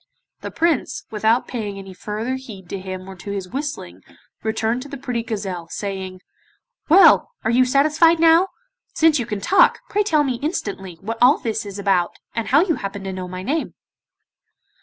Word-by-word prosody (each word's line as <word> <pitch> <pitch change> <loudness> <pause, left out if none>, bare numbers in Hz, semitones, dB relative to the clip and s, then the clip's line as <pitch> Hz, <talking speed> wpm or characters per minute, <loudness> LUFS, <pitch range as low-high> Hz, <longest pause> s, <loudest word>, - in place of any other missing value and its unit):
The - - -6
Prince 325 -6 0
without 220 +3 +1
paying 210 -5 -4
any 195 -1 -9
further 215 +6 -4
heed 220 -8 -8
to 195 - -4
him 185 0 -7
or 195 - -8
to 200 - -9
his 195 -2 -4
whistling 265 - -5 0.4
returned 220 +2 -1
to 285 - -9
the 280 - -6
pretty 250 -3 -3
gazelle, 195 -7 -5
saying: 190 -2 -5 0.7
'Well! 335 0 +7
are 220 - +1
you 255 +2 +4
satisfied 310 +5 +4
now? 330 +3 +5 0.5
Since 320 -3 +4
you 240 - -3
can 210 -3 -4
talk, 380 - +4
pray 415 - +1
tell 315 -8 +2
me 260 -4 -1
instantly 200 - -4
what 225 +3 -5
all 255 +4 +6
this 220 -2 -3
is 200 0 -7
about, 195 -3 +1 0.2
and 230 - -3
how 285 +4 +5
you 330 -5 0
happen 195 0 -6
to 190 -1 -4
know 185 -1 -5
my 185 +1 -6
name. 305 +8 -2
225 Hz, 180 wpm, -21 LUFS, 195-285 Hz, 0.7 s, Well